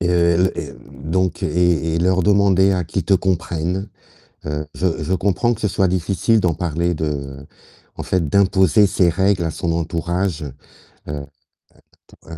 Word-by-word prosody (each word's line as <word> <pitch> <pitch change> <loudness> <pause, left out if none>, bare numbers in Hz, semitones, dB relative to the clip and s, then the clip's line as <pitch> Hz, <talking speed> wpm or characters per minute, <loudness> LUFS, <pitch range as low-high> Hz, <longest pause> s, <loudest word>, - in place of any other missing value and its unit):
et 90 - 0
heu 85 -1 +3
et - - +2 0.3
les - - -9
et - - -10 0.3
donc 95 +2 -1
et 85 -2 +1
et 85 - 0
leur 95 +1 +2
demander 100 0 +3
à 90 -3 -1
qu'ils 85 +1 -3
te 95 - +3
comprennent. 90 +1 -1 0.6
Heu, 75 0 -3
je 85 -3 -1
je 90 - -1
comprends 100 +6 +1
que - - -9
ce 105 - +1
soit 95 -1 +1
difficile 95 +5 +1
d'en 90 -5 +1
parler 85 0 -1
de 70 -3 -4 0.5
en - - -5
fait 90 -4 0
d'imposer 95 +1 +4
ses 90 -2 +2
règles 95 0 +1
à 80 - -2
son 85 - -3
entourage. 85 +1 -2 0.7
Heu, 75 - -4
un - - -3
un 70 - -5 0.8
entourage 80 0 -14
90 Hz, 180 wpm, -20 LUFS, 80-95 Hz, 0.8 s, d'imposer